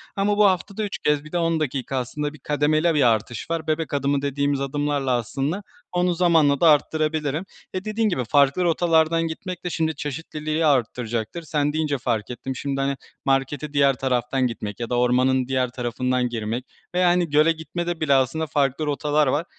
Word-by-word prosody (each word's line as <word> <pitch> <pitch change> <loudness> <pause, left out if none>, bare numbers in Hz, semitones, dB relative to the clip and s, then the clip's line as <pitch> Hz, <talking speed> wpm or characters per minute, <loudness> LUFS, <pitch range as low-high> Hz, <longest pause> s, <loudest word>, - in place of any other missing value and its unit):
ama 205 0 +1
bu 210 - +6
haftada 195 +2 0
3 205 - -3
kez 150 -1 +1
bir 155 - -12
de 175 - -1
10 165 -1 +1
dakika, 135 -2 -2
aslında 145 +4 -3
bir 150 - -14
kademeli 155 +3 +1
bir 150 -3 +3
artış 110 +5 -5
var, 165 -1 -2
“bebek 155 0 -1
adımı“ 140 0 +1
dediğimiz 140 0 0
adımlarla 145 -1 -1
aslında, 135 - -1 0.3
onu 180 0 +1
zamanla 160 -5 +3
da 170 - +7
arttırabilirim. 155 +1 +1 0.3
E, 185 +2 -4
dediğin 215 +1 0
gibi, 130 -9 -1
farklı 140 +7 +3
rotalardan 165 -1 +2
gitmek 180 +2 -6
de, - - 0
şimdi, 160 -2 -1
çeşitliliği 155 +2 -3
arttıracaktır. 120 0 0
Sen 150 -2 0
deyince 155 -2 0
fark 115 -4 -2
ettim, 130 +2 -5
şimdi, 135 +1 -2
hani, 140 0 0 0.3
markete 135 +2 0
diğer 140 -1 +4
taraftan 125 0 0
gitmek 105 -4 -6
ya 120 - -4
da 125 - 0
ormanın 125 +1 +2
diğer 130 -1 0
tarafından 125 +1 -1
girmek 115 +2 -3 0.3
ve, - - +2
yani, 175 -1 +3
göle 150 +3 +4
gitmede 170 +1 -4
bile 145 -3 +3
aslında 135 +4 +2
farklı 140 +1 0
rotalar 150 +1 +1
var. 145 +6 0
145 Hz, 180 wpm, -23 LUFS, 130-160 Hz, 0.3 s, da